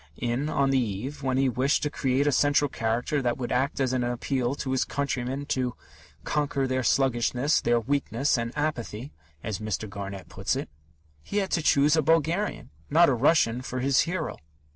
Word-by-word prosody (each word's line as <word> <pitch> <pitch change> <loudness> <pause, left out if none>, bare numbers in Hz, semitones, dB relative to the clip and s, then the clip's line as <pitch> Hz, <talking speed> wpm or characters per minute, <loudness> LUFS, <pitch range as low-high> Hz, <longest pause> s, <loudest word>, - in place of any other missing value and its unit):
In 120 +5 -1
On 140 -2 +1
the 135 - +3
Eve, 125 +6 -4
when 130 -1 0
he 135 0 +3
wished 130 +3 +1
to 150 - -1
create 135 +1 +1
a 145 - +3
central 145 +2 +3
character 120 +6 -1
that 120 -2 0
would 125 -2 -4
act 130 +3 0
as 130 -2 +1
an 125 -1 +1
appeal 120 +2 -1
to 130 - -4
his 130 - +2
countrymen 135 0 -3
to 125 -3 -1 0.5
"conquer 145 -2 0
their 130 0 0
sluggishness, 130 +2 +2
their 120 0 +2
weakness 140 +2 0
and 115 -1 -2
apathy" 135 -4 -3 0.3
(as 105 -3 -3
Mr. 110 0 -3
Garnett 100 -1 -7
puts - - -2
it), - - -4 0.5
he 200 - -5
had 195 -2 0
to 165 - +1
choose 145 0 +4
a 160 - +3
Bulgarian, 165 +6 0 0.2
not 165 +2 +5
a - - +3
Russian, 125 -2 +3
for 130 0 -4
his 135 +1 +2
hero. 170 -1 -1
130 Hz, 185 wpm, -26 LUFS, 120-145 Hz, 0.5 s, not